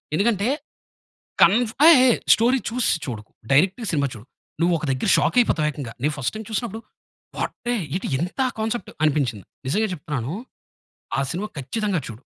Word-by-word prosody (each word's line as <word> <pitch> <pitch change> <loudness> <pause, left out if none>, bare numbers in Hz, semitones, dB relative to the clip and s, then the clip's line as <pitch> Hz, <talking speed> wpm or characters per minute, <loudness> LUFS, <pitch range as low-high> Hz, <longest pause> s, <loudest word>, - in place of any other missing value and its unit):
ఎందుకంటే, 205 +2 +1 1.0
కన్ 190 +5 +7 0.3
ఏయ్! 335 - +9
ఏయ్! 245 - +5 0.2
స్టోరీ 245 +4 +3
చూసి 245 +1 +1
చూడకు. 110 -5 -7 0.2
డైరెక్ట్‌గా 190 - +3
సినిమా 145 -3 +1
చూడు. 110 +1 -12 0.3
నువ్వు 170 +1 +3
ఒక 160 - -7
దగ్గర 130 +9 -1
షాక్ - - +1
అయిపోతావు 160 -10 +2
ఏకంగా. 140 -6 -7
నేను 150 +2 +1
ఫస్ట్ 125 -3 -1
టైమ్ 220 -1 -7
చూసినప్పుడు 225 0 -3 0.6
వాటే 240 - -3 0.2
ఎటి 190 - -3
ఎంత 180 +10 -3 0.2
కాన్సెప్ట్ 220 -1 -2
అనిపించింది. 135 -9 +1 0.2
నిజంగా 210 +11 +1
చెప్తున్నాను. 145 -6 -4 0.9
ఆ - - +2
సినిమా 195 +5 -3
ఖచ్చితంగా 185 - -1
చూడు. 115 0 -9
175 Hz, 150 wpm, -23 LUFS, 140-220 Hz, 1.0 s, ఏయ్